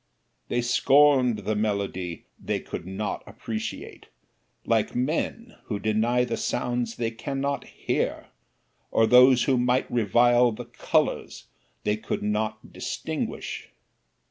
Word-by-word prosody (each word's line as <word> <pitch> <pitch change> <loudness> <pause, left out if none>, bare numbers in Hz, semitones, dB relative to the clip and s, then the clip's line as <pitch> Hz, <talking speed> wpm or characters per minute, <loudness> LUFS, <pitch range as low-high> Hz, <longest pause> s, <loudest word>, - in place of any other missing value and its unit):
They 120 0 0
scorned 130 -3 +4
the 110 - +1
melody 100 -5 -2
they - - -2
could 85 - -7
not 100 +3 -3
appreciate, 110 -1 -6 0.6
like 110 -2 +1
men 165 - -2
who 105 - -3
deny 110 +4 +1
the - - -3
sounds 120 -2 -2
they 115 -1 -2
can 135 +4 -5
not 140 0 -2
hear; - - -2 0.6
or 115 - +3
those 125 +1 +7
who 130 -3 +2
might 125 +1 +1
revile 120 +2 +4
the 120 +3 -7
colors 120 - -1 0.4
they 105 0 +1
could 110 - -4
not 110 +1 -2
distinguish. - - -4
120 Hz, 120 wpm, -26 LUFS, 110-125 Hz, 0.6 s, those